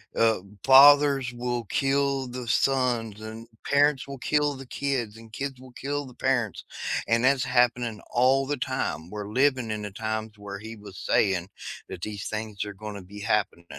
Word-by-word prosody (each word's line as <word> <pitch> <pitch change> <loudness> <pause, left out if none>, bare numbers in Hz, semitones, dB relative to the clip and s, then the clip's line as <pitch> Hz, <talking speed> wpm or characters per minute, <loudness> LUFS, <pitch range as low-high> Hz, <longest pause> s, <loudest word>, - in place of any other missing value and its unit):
uh, 115 -2 +3 0.2
"Fathers 140 -1 +7
will 120 0 -2
kill 135 +2 +1
the 125 -1 -6
sons, 120 -4 +1
and 110 +1 -8 0.2
parents 140 -1 +3
will 140 0 -7
kill 150 +2 +1
the 135 0 -9
kids, 125 -6 -2
and 115 -1 -15
kids 135 0 -4
will 130 0 -13
kill 145 +3 -3
the 130 - -12
parents," 120 -4 -1 0.4
and 115 +1 +2
that's 135 0 +4
happening 120 -3 +1
all 130 +2 +3
the 145 +1 -2
time. 80 -9 -3
We're 105 +1 -6
living 130 -1 +2
in 105 -1 -3
the 105 -1 -5
times 110 +1 -3
where 100 -1 -7
He 110 +2 -8
was 105 -3 -12
saying 95 -3 +1 0.4
that 90 - -7
these 105 +1 -5
things 110 -2 -4
are 105 - -6
gonna 105 0 -7
be 100 +3 -11
happening, 105 -5 0
120 Hz, 175 wpm, -26 LUFS, 105-135 Hz, 0.4 s, Fathers